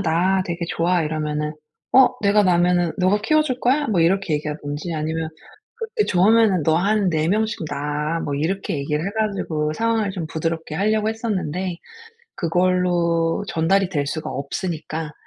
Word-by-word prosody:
낳아 185 +2 +2
되게 175 -1 -5
좋아." 175 +1 +1
이러면은 150 -1 -2 0.4
"어 265 0 +7
내가 205 +1 +4
낳으면은 175 -2 +2
너가 185 +3 +2
키워 310 +6 +3
줄 255 -4 -3
거야?" 280 +4 +2
뭐 195 -6 +1
이렇게 180 0 +2
얘기하든지 150 +2 -4
아니면 160 +1 -2 0.5
"그렇게 450 -1 -2
좋으면은 200 -1 +4
너 160 +1 +3
한 200 +2 +2
4 155 0 0
명씩 215 +2 0
낳아." 150 +3 -2
뭐 145 - -3
이렇게 165 +4 -2
얘기를 150 +3 -2
해 200 - -1
가지고 170 -8 -1
상황을 225 -1 0
좀 180 -4 -5
부드럽게 160 0 -3
하려고 215 +3 +1
했었는데 190 -6 -2 0.6
그걸로 175 0 +1
전달이 190 +1 +2
될 145 -6 -1
수가 155 +2 -4
없으니까 155 +1 -4
175 Hz, 345 characters per minute, -22 LUFS, 155-200 Hz, 0.6 s, 어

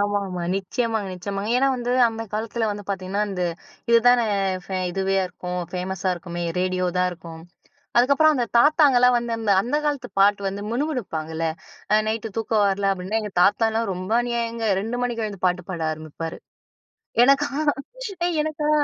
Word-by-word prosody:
ஆமாமா. 200 -3 -1
நிச்சயமாங்க 220 +1 -2
நிச்சயமாங்க. 200 +3 -4
ஏன்னா, 275 +1 +3
வந்து 245 0 -2 0.2
அந்த 225 0 -5
காலத்ல 225 +1 -2
வந்து 205 0 -6
பார்த்தீங்கன்னா, 195 +1 -2
இந்த 180 -2 -3 0.5
இதுதானே 235 0 +5 0.4
ஃபே 190 - -4
இதுவேயா 195 +1 0
இருக்கும். 180 0 -5
ஃபேமஸா 185 +1 -2
இருக்குமே, 175 0 -6 0.2
ரேடியோ 185 0 0
தான் 180 0 +3
இருக்கும். 165 -2 -10 0.6
அதுக்கப்புறம் 280 +5 +5
அந்த 240 -2 +1
தாத்தாங்கலாம் 250 -3 +5
வந்து, 235 0 -3
அந்த 220 -3 0
அந்த 260 +7 -1
காலத்து 275 -4 -1
பாட்டு 200 0 +4
வந்து 200 +1 -4
முணுமுனுப்பாங்கல்ல. 165 - -2 0.5
அ - - +7
நைட்டு 225 0 -2
தூக்கம் 220 -2 +1
வரல 195 0 +1
அப்டின்னா, 190 +4 -2
எங்க 210 -2 -6
தாத்தாலாம் 225 +1 +2
ரொம்ப 185 +3 -6
அநியாயங்க. 235 -1 -2 0.2
2 235 +3 -3
மணிக்கு 235 -2 -2
எழுந்து 200 -3 -7
பாட்டு 180 0 +1
பாட 170 -3 -4
ஆரம்பிப்பாரு. 155 +1 -6 0.9
எனக்கா? 275 +3 +4 0.8
ஏய்! 350 -1 0
எனக்கா? 305 -1 -2
210 Hz, 150 wpm, -23 LUFS, 185-240 Hz, 0.9 s, அ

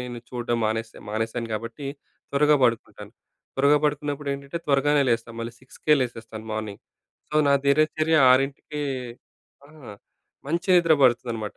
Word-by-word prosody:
నేను 125 -1 -6
చూడడం 120 -1 -2
మానేసే 110 +1 -3
మానేసాను 115 +2 -3
కాబట్టి 115 +6 -5 0.4
త్వరగా 150 +1 +4
పడుకుంటాను. 115 -2 -1 0.4
త్వరగా 140 +2 +4
పడుకున్నప్పుడేంటంటే 145 0 -2
త్వరగానే 145 +1 +3
లేస్తాను. 115 0 -1
మళ్ళీ 115 0 -5
సిక్స్‌కే 150 +3 0
లేసేస్తాను 115 -3 -5
మార్నింగ్. 110 -2 -5 0.5
సో, - - -8
నా - - +5
దినచర్య 155 +2 +2
ఆరింటికే 135 +3 0 0.9
ఆ! - - -18 0.8
మంచి 170 +6 -2
నిద్ర 165 -2 +4
పడుతుందనమాట. 120 -4 +1
130 Hz, 120 wpm, -24 LUFS, 115-145 Hz, 0.9 s, నా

